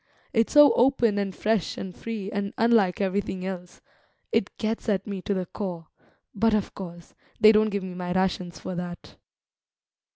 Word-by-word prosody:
It's 225 -2 +2
so 295 -1 +8
open 240 -5 +3
and 195 -2 -3
fresh 215 -3 0
and 185 -2 -6
free, 215 -3 -5
and 200 -1 -3
unlike 225 -5 +3
everything 190 -1 -1
else; 180 -2 -7 0.5
it - - +1
gets 220 0 -2
at 195 -2 0
me 200 -3 -5
to 200 - -1
the 185 -1 -2
core; 175 -4 -6 0.4
but, 225 +2 +2
of 210 - -2
course, 175 -3 -9 0.3
they 215 -1 +8
don't 215 0 +4
give 200 -2 -2
me 185 -1 -6
my 180 0 -4
rations 180 -1 -1
for 185 - -6
that." 175 0 -7
195 Hz, 170 wpm, -26 LUFS, 180-215 Hz, 0.5 s, so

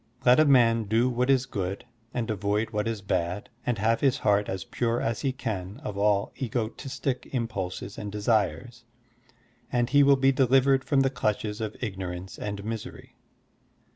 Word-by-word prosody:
Let 125 +3 +6
a 155 - +6
man 115 -5 +4
do 115 +5 +2
what 125 +2 0
is 135 -1 +4
good 95 -1 -4 0.3
and 120 -3 -2
avoid 105 +2 -1
what 105 0 -1
is 110 -3 -3
bad 90 0 -2 0.2
and 120 -2 +1
have 115 +3 +1
his 135 -3 +3
heart 105 0 +2
as 95 -2 -3
pure 120 -1 -1
as 115 0 -2
he 135 - 0
can 105 -4 -5
of 105 - -5
all 100 0 +1
egotistic 130 +2 -3
impulses 100 -5 -4
and 105 -1 -5
desires, 105 +1 -1 0.9
and 120 0 0
he 145 0 +6
will 140 0 +6
be 135 +1 +3
deliver^ 135 +1 +4
from 140 -1 +2
the 135 -1 +2
clutches 105 -3 -2
of 110 -1 -4
ignorance 95 -4 -5
and 100 -1 -5
misery. 110 -1 -6
115 Hz, 170 wpm, -27 LUFS, 100-125 Hz, 0.9 s, Let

